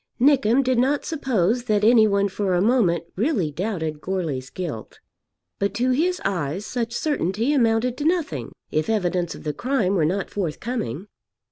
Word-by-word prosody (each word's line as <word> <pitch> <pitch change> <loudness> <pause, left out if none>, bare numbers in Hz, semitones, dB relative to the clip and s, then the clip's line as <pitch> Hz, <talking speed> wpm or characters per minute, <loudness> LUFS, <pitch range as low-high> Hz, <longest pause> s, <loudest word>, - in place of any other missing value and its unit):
Nickem 265 -1 +4
did 255 -2 +1
not 275 +3 +1
suppose 245 - 0
that 210 -3 +1
any 220 0 +6
one 200 -1 +2
for 195 -1 -1
a - - +2
moment 205 -7 +2
really 210 - 0
doubted 160 -4 -3
Goarly's 160 -9 -3
guilt. 155 - -6 0.6
But 200 0 -1
to 250 +2 +1
his 350 +8 +1
eyes 180 0 -2
such 235 -1 -3
certainty 235 - 0
amounted 235 -1 +2
to 290 - -3
nothing, 310 - -1 0.2
if 155 +4 0
evidence 180 -5 0
of - - -11
the 150 - -2
crime 225 - 0
were 180 -5 +2
not 185 +4 -1
forthcoming. 190 - -3
210 Hz, 160 wpm, -23 LUFS, 175-250 Hz, 0.6 s, any